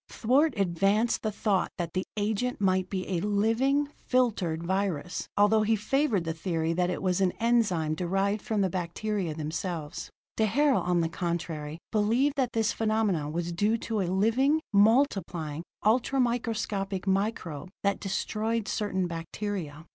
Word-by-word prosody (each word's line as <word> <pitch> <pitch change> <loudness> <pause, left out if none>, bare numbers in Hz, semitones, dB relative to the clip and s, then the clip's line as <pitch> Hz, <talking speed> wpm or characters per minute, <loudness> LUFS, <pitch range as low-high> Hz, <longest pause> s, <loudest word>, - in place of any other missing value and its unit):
Twort 270 +4 +2
advanced 195 +5 +2
the 215 - -1
thought 200 -2 0
that 170 -2 -3
the 185 - -1
agent 220 +4 -1
might 185 -2 +1
be 185 -2 -3
a 180 -3 -1
living, 225 +8 +2 0.2
filtered 205 -11 +1
virus, 180 -3 -2
although 205 +2 +5
he 220 +1 +3
favored 220 - +1
the 165 -1 -2
theory 165 -1 -1
that 180 +1 +1
it 180 - -3
was 185 0 +1
an 185 -2 +2
enzyme 210 -10 +1
derived 195 +5 0
from 215 -2 -1
the 190 - +2
bacteria 180 0 -2
themselves. 160 0 -4 0.3
D'Herelle, 265 +6 +3
on 175 -1 +1
the 165 - +1
contrary, 165 -2 -3
believed 230 +7 +2
that 255 -3 0
this 225 -1 +1
phenomenon 215 -9 0
was 170 +1 -2
due 205 +6 +1
to 220 -2 -2
a 185 - -1
living, 230 - +3
multiplying, 200 - +2 0.2
ultra 250 +5 +2
microscopic 215 -6 -1
microbe 190 -5 -1
that 200 0 +1
destroyed 215 +2 -2
certain 190 -4 -1
bacteria. 165 -2 -5
200 Hz, 145 wpm, -28 LUFS, 175-225 Hz, 0.3 s, although